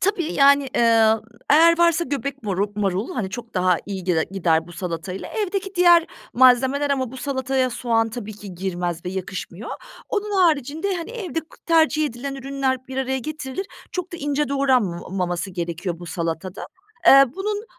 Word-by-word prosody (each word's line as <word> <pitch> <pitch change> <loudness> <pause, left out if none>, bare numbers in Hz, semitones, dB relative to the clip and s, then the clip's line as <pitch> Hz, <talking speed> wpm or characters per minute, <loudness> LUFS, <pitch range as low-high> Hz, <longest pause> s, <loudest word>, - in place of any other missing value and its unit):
Tabii, 360 -4 0
yani, 280 -1 +5
eee, 225 -2 +5 0.4
eğer 330 +3 +6
varsa 340 0 +3
göbek 280 -1 -4
marul 200 -1 -1
marul, 200 0 -1
hani, 200 -6 -2
çok 230 +3 -8
daha 180 -1 +3
iyi 195 -3 -5
gide 170 -3 +1
gider, 165 -4 +1
bu 175 - -12
salatayla. 175 +1 -5
Evdeki 395 -2 -3
diğer 345 -1 +6 0.3
malzemeler 260 +3 +4
ama 260 -3 -1
bu - - -8
salataya 260 -1 -1
soğan 225 -1 0
tabii 220 -2 -7
ki 200 -2 -10
girmez 175 -2 -3
ve 180 - -3
yakışmıyor. 190 +1 -6 0.4
Onun 410 -2 0
haricinde, 320 +4 +1
hani, 335 +6 -6
evde 385 -9 -4
k 320 - -20
tercih 320 -2 +3
edilen 275 +2 -5
ürünler 270 -1 -1
bir 265 - -7
araya 265 0 -1
getirilir, 300 +5 -5 0.3
çok 360 -1 -4
da - - -4
ince 290 -1 -1
doğranmamaması 190 -9 0
gerekiyor, 170 0 -4
bu 175 - -9
salatada. 170 +1 -4 0.4
Eee, 275 0 +9
bunun 415 +2 -2
260 Hz, 160 wpm, -22 LUFS, 190-305 Hz, 0.4 s, Eee